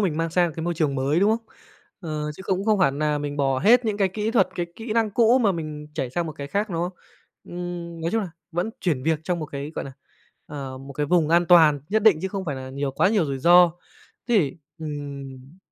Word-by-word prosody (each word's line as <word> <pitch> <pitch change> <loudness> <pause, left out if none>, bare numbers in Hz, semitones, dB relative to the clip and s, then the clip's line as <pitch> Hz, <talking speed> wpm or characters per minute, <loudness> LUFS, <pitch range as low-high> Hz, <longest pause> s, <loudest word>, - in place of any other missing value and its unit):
mình 180 -7 0
mang 165 +1 -1
sang 175 +1 +3
một 160 - -8
cái 160 - -4
môi 175 0 -1
trường 155 -4 0
mới, 140 +6 +1
đúng 205 - +4
không? 225 0 -1 0.5
Ờ, 155 -4 -4
chứ 190 - -9
cũng 190 +1 -1
không 215 -2 +3
phải 180 -6 +4
nà 150 +1 -1
mình 145 0 -4
bỏ 135 -2 +1
hết 235 - +5
những 210 -2 -1
cái 195 -2 +2
kỹ 210 +3 -2
thuật, 225 -6 +3
cái 175 -1 -2
kỹ 225 -1 -5
năng 225 -2 +1
cũ 235 +4 +4
mà 210 -6 +3
mình 155 -2 -6
chảy 130 -5 -3
sang 175 +4 -2
một 155 - -5
cái 140 -1 -7
khác, 205 +6 -2
đúng 165 -1 -1
không? 180 +2 -3 0.5
Ừm, 175 -1 -6
nói 165 +1 -1
chung 225 +1 +1
là 190 - -5 0.2
vẫn 175 +6 -1
chuyển 150 -8 0
việc 160 +1 +1
trong 175 -2 -1
một 155 - -4
cái, 140 +1 -6
gọi - - -4
là, 135 - -8 0.5
ờ, 135 -3 -7
một 135 +1 -10
cái 145 +2 -2
vùng 165 -2 +2
an 170 +1 +3
toàn 160 -4 +6
nhất 215 +1 +1
định 210 -8 +6
chứ 190 - -1
không 195 0 -4
phải 145 -6 -3
là 130 0 -7
nhiều 140 +1 -2
quá 135 - +2
nhiều 205 -5 +2
rủi 135 -2 -3
ro. 175 +3 +6 0.6
Thế 240 - +3
thì 160 0 0 0.2
ừm. 140 -1 -7
165 Hz, 260 wpm, -24 LUFS, 145-190 Hz, 0.6 s, toàn